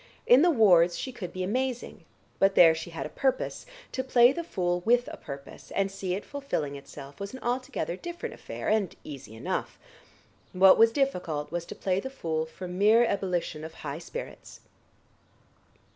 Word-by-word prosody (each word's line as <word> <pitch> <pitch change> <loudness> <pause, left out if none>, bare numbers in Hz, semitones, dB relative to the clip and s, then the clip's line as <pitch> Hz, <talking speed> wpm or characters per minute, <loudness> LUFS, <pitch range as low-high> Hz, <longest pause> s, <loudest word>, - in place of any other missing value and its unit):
In 250 +3 +7
the 350 - +5
wards 180 - +5
she 260 - -4
could 190 -8 -7
be 185 0 -4
amazing, 250 +5 -3 0.3
but 195 0 +4
there 165 -2 +8
she 160 +1 -6
had 165 - -5
a - - -5
purpose: 265 -1 -1 0.2
to 260 - -2
play 245 -1 +6
the 340 +5 -4
fool 175 - -1
with 245 +3 +3
a - - -6
purpose 140 -1 -10
and 195 0 +1
see 190 -2 -3
it 200 - -6
fulfilling 270 - -3
itself 140 0 -11
was 200 +3 -6
an - - -8
altogether 240 -9 -2
different 345 - -6
affair - - -7
and 215 -2 +2
was - - -19
easy 135 -7 -9
enough. 110 - -3 0.8
What 190 +1 +7
was 225 0 +7
difficult 180 - -1
was 170 0 -3
to - - -7
play 185 -1 0
the 265 - -5
fool 160 -11 -3
from 180 +2 -7
mere 220 +4 +6
ebullition 180 -7 -2
of 160 0 -8
high 145 +1 -6
spirits. - - -9
190 Hz, 180 wpm, -28 LUFS, 165-245 Hz, 0.8 s, there